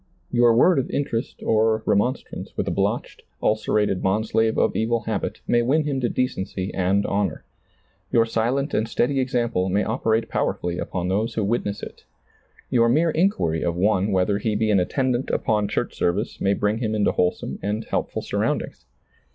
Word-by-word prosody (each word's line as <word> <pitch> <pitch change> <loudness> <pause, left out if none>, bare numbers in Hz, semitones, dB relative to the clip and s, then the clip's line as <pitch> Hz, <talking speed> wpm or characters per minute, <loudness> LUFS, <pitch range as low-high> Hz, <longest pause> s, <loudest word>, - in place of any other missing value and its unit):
Your 120 -1 +4
word 165 +6 +5
of 130 - -2
interest 130 -4 -3
or 110 0 +2
remonstrance 105 +6 -1
with - - -1
a - - 0
blotched, - - -2 0.2
ulcerated 105 -2 +1
bondslave 110 +3 +1
of - - +2
evil 115 +1 +1
habit 110 -4 -3
may 120 - +3
win 140 +6 +2
him 145 -3 -1
to 120 - +1
decency 95 -6 -2
and 95 +2 +1
honor. 100 -5 -1 0.7
Your 115 -1 +4
silent 125 +6 -1
and 110 +1 0
steady 135 +4 +1
example 120 -7 0
may 100 +3 +1
operate 110 -1 0
powerfully 90 0 -2
upon 90 -1 -3
those 105 +4 -1
who 110 - 0
witness 100 -1 -1
it. - - -9 0.7
Your 115 -1 +4
mere 160 +7 +3
inquiry 155 - +1
of 85 - -1
one 100 +2 +2
whether 95 +2 +1
he 110 -1 -1
be 110 0 +1
an 100 - +4
attendant 130 +6 0
upon 105 -2 +1
church - - -2
service 90 +6 -1
may 100 +1 +2
bring 105 +2 0
him 110 -3 -1
into 105 - +2
wholesome 90 0 -1
and 105 +3 -2
helpful - - -2
surroundings. - - -2
110 Hz, 170 wpm, -23 LUFS, 100-120 Hz, 0.7 s, word